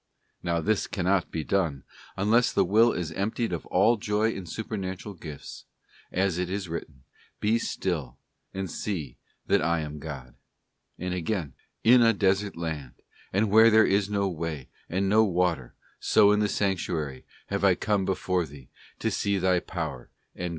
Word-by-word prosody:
Now 85 -1 0
this 105 +4 +1
cannot 95 -1 0
be 80 - -3
done 80 -8 0 0.3
unless 115 +5 +3
the - - +2
will 115 +4 +5
is 85 -3 -3
emptied 105 +4 -2
of 85 - -4
all 120 0 +4
joy 105 +2 +1
in 95 -4 -6
© - - -14
supernatural 100 -1 -5
gifts, 80 -5 -9 0.5
as 95 -1 0
it 90 -1 -1
is 95 0 -3
written, 75 -5 -7 0.2
' - - -32
Be 115 +2 +3
still, 80 - -3 0.3
and 95 0 -4
see 80 - -4 0.3
that - - +3
lam 75 -3 -1
God,' 70 -5 -8 0.6
t 90 - -6
and 90 - -1
again, 90 -4 -2 0.3
'In 120 +2 +7
a 115 -1 +5
desert 100 0 +1
land, 80 -6 -5 0.3
and 100 +2 +1
where 110 +2 +8
there 110 0 +6
is 100 +1 +2
no 100 -1 +1
way, 80 -6 -4 0.2
and 95 +3 0
n® 110 -1 +4
water, 85 -7 0 0.2
so 100 - +5
in 105 - +3
the 105 -1 +1
sanctuary 85 -10 -1 0.3
have - - -2
I - - +5
come 105 -2 0
before 95 -2 0
Thee, 70 -3 -14 0.3
to - - -1
see 100 -1 0
Thy 95 -1 +2
power 80 -9 -5 0.2
and - - -20
glory. 90 0 -2
95 Hz, 175 wpm, -27 LUFS, 80-105 Hz, 0.6 s, where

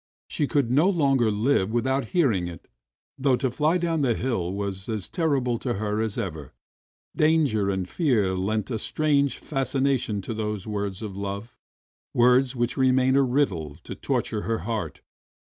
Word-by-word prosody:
She 145 - -1
could 140 -6 +1
no 150 +9 +4
longer 135 - +2
live 105 -1 +1
without 130 +3 0
hearing 115 - +1
it! 85 -3 -10 0.5
Though 135 -1 +3
to 130 0 -1
fly 155 +7 +2
down 165 -3 0
the 125 -5 +2
hill 105 -9 -1
was 100 0 -3
as 110 -4 -2
terrible 135 -8 0
to 120 -2 -2
her 105 +1 -1
as 110 -2 -2
ever, 80 - -5 0.6
danger 150 -11 +2
and 95 -2 -1
fear 110 - +1
lent 105 +4 -1
a 110 - -1
strange 140 +1 +1
fascination 135 -5 0
to 115 - -4
those 105 -2 -3
words 100 -1 -3
of 100 -3 -6
love, 100 +3 -5 0.6
words 125 +2 +4
which 120 0 -1
remained 130 0 +3
a 140 - +5
riddle 110 - 0
to - - -7
torture 105 - -2
her 115 +1 -2
heart. 115 -2 -3
120 Hz, 160 wpm, -25 LUFS, 100-135 Hz, 0.6 s, a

